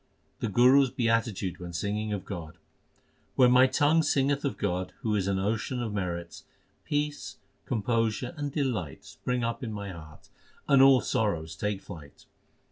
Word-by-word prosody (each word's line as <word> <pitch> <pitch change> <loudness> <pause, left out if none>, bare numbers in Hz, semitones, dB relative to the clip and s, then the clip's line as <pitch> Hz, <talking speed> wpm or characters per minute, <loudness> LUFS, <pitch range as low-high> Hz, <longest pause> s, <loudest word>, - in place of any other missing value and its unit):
The - - -1
Guru 125 +6 +6
s - - -4
beatitude 115 -7 -1
when 90 -1 -7
singing 105 +5 -2
of 100 -3 -4
God: 85 -6 -7 0.8
When 125 -2 +5
my 125 +1 +7
tongue 150 +4 +3
singeth 140 -1 +1
of 140 - -2
God, 90 -1 -2
who 110 -2 0
is 95 -2 0
an 100 -1 +1
ocean 110 +6 -1
of 115 -3 -3
merits, 85 -4 -4 0.4
Peace, 145 0 -2 0.3
composure, 115 +2 -1
and 145 -2 -4
delight 120 - -3
spring 125 -1 -3
up 115 +2 -2
in 115 - -4
my 100 -2 -5
heart, 80 -3 -13 0.4
and 140 -2 +6
all 135 -2 +7
sorrows 80 -7 -1
take 105 +3 -2
flight. 75 -7 -12
110 Hz, 160 wpm, -28 LUFS, 95-130 Hz, 0.8 s, my